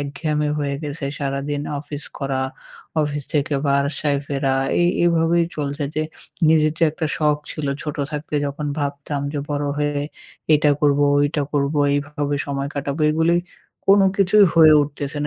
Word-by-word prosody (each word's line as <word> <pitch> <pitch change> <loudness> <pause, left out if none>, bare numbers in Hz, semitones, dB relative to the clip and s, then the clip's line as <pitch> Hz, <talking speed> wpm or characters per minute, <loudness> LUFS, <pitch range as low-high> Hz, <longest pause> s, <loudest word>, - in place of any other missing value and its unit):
একঘেয়েমি 150 +1 -2
হয়ে 140 -1 -1
গেছে। 145 0 -5
সারাদিন 140 +1 -2 0.2
অফিস 145 0 -8
করা, 135 -2 -1 0.6
অফিস 145 0 -2
থেকে 145 0 +1
বাসায় 140 +1 +1
ফেরা। 135 -1 0 0.3
এই, 175 - +4 0.2
এইভাবেই 170 0 +3
চলছে 145 0 -2
যে 155 - 0 0.5
নিজের 155 -1 +4
যে - - -2
একটা 160 +1 -3
শখ 150 -1 +2
ছিল, 155 -2 -4 0.2
ছোট 150 +1 -5
থাকতে 150 0 -5
যখন 145 +1 -4
ভাবতাম 140 0 -3
যে 150 - -2
বড় 145 0 -1
হয়ে 145 -1 0 0.5
এটা 150 0 +4
করবো, 145 -1 +3 0.2
ওইটা 145 0 +1
করবো। 145 +1 0 0.2
এইভাবে 145 0 -2
সময় 140 0 -2
কাটাবো, 140 +1 -3
এগুলোই 165 +2 +2 0.5
কোন 200 +1 +6 0.2
কিছুই 200 +1 +5
হয়ে 160 -2 +8
উঠতেছে 145 0 -5
না - - -1
145 Hz, 155 wpm, -21 LUFS, 140-155 Hz, 0.6 s, হয়ে